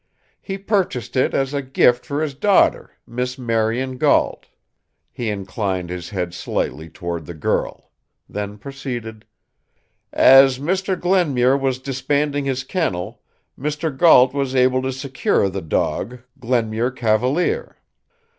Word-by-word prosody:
He 195 -1 -5
purchased 190 - -1
it 130 - +1
as 135 +1 0
a 140 - -1
gift 125 -2 +2
for 145 +2 -1
his 150 -3 -3
daughter, 195 +9 +2
Miss 125 +2 -4
Marion 120 +2 -1
Gault." - - +2 0.6
He 120 -2 -4
inclined 95 -3 -3
his 90 -1 -6
head 90 -3 -3
slightly 80 -2 -3
toward 85 -1 -5
the 85 - -7
girl; 75 - -2 0.4
then 105 0 -5
proceeded: 120 -3 -7 0.9
"As 135 -1 +7
Mr. 185 +5 -1
Glenmuir 145 -9 +2
was 135 -2 0
disbanding 140 +2 -1
his 135 -1 -1
kennel, 115 - -3 0.3
Mr. 150 +1 -3
Gault 130 -4 +6
was 135 -2 -2
able 130 0 +3
to 130 0 -2
secure 130 -6 0
the 95 +1 -5
dog 120 +8 -2 0.2
Glenmuir 120 -1 0
Cavalier. 130 - 0
130 Hz, 125 wpm, -20 LUFS, 110-140 Hz, 0.9 s, As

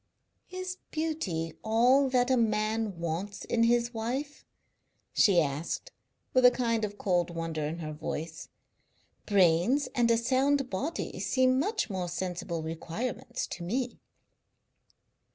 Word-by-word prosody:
"Is 370 0 -5
beauty 220 - -2
all 245 +5 +4
that 250 0 +2
a - - +5
man 215 -3 0
wants 170 +5 -4
in 235 - 0
his 240 +1 +3
wife?" 260 +6 -3 0.7
she 195 -4 +5
asked, 155 - -2 0.4
with 255 - +4
a 250 - +10
kind 230 -3 0
of 205 -1 -3
cold 175 -4 +1
wonder 165 -2 -3
in 160 +2 -4
her 155 -2 -5
voice. 160 +1 -5 0.8
"Brains 195 - +3
and 240 -3 +2
a 230 - +5
sound 265 +3 +1
body 280 - -3
seem 260 0 +2
much 415 - -1
more 185 -2 -2
sensible 175 -2 -3
requirements 235 +10 -4
to - - -7
me." 240 +7 -2
225 Hz, 130 wpm, -29 LUFS, 170-255 Hz, 0.8 s, a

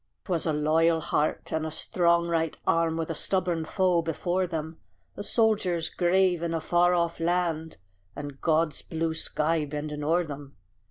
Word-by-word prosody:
'Twas 170 -4 0
a - - +2
loyal 160 +2 +2
heart, 155 -1 -1
and 160 0 0
a 160 - -2
strong 170 +2 +2
right 165 -2 -1
arm, 165 -1 +2
With 165 0 -2
a - - -1
stubborn 175 -1 0
foe 180 0 +2
before 175 +3 -1
them; 160 -1 -5 0.4
A - - -6
soldier's 205 -7 +1
grave 180 -1 +2
in 170 -1 -1
a - - 0
far 175 +2 +3
off 170 -1 0
land, 165 -2 -1 0.4
And 145 -2 -7
God's 160 -2 +1
blue 160 0 -2
sky 160 0 0
bending 150 0 -5
o'er 170 +4 +2
them. 145 -3 -9
165 Hz, 165 wpm, -27 LUFS, 155-175 Hz, 0.4 s, far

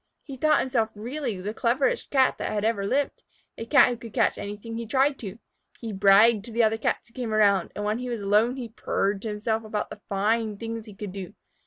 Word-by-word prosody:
He 275 - -8
thought 305 +4 +3
himself 235 -4 0
really 240 -1 -4
the 205 +3 -4
cleverest 265 - 0
Cat 265 -2 +3
that - - -2
had 210 0 -1
ever 205 -3 0
lived, 280 +5 -1 0.3
a 225 - -7
Cat 275 0 +6
who 245 - -3
could 230 -1 -11
catch - - +2
anything 205 +3 -6
he 230 0 -5
tried 270 +4 +2
to. 200 -2 -7 0.4
He 225 -2 -5
bragged 200 +3 +5
to 235 - -8
the 230 +1 +2
other 220 0 +2
Cats - - -1
who 230 - -23
came 235 -4 -3
around, 200 -4 +3
and 205 - -3
when 215 +2 0
he 250 0 -4
was 235 -3 -3
alone 210 +5 +2
he 245 -3 -6
purred 200 -2 -1
to 225 - -5
himself 220 +1 -2
about 215 -1 -4
the 210 - -9
fine 210 +2 0
things 225 0 -6
he 210 - -11
could 200 -1 -6
do. 195 +1 -7
220 Hz, 230 wpm, -26 LUFS, 205-240 Hz, 0.4 s, Cat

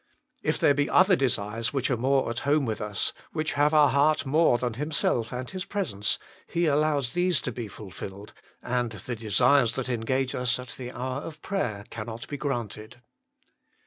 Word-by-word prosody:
If - - 0
there 145 - +4
be 145 +1 0
other 185 0 +6
desires 115 -4 -1
which 135 -1 0
are - - +3
more 135 +3 +2
at 120 - -2
home 145 0 +2
with 110 -2 -3
us, 105 -1 -1 0.2
which 155 -1 -1
have 145 +1 +3
our 150 -2 +6
heart 145 +3 +3
more 150 -2 +4
than 120 -1 -2
Himself 130 -4 0
and 125 0 -4
His 185 +4 -4
presence, 145 - -1 0.3
He 170 +1 0
allows 145 -4 +1
these 180 -3 +3
to 125 - -3
be 115 -1 -5
fulfilled, 100 0 -9 0.3
and 120 -2 -1
the 110 +4 -5
desires 115 +3 +3
that 130 -1 -2
engage 130 +2 0
us 125 -1 +1
at 125 -1 -8
the 125 -1 -7
hour 130 +2 -3
of 155 -1 -9
prayer 110 - -2
cannot 115 +1 -6
be 145 - -5
granted. 120 -5 -4
130 Hz, 180 wpm, -27 LUFS, 115-145 Hz, 0.3 s, other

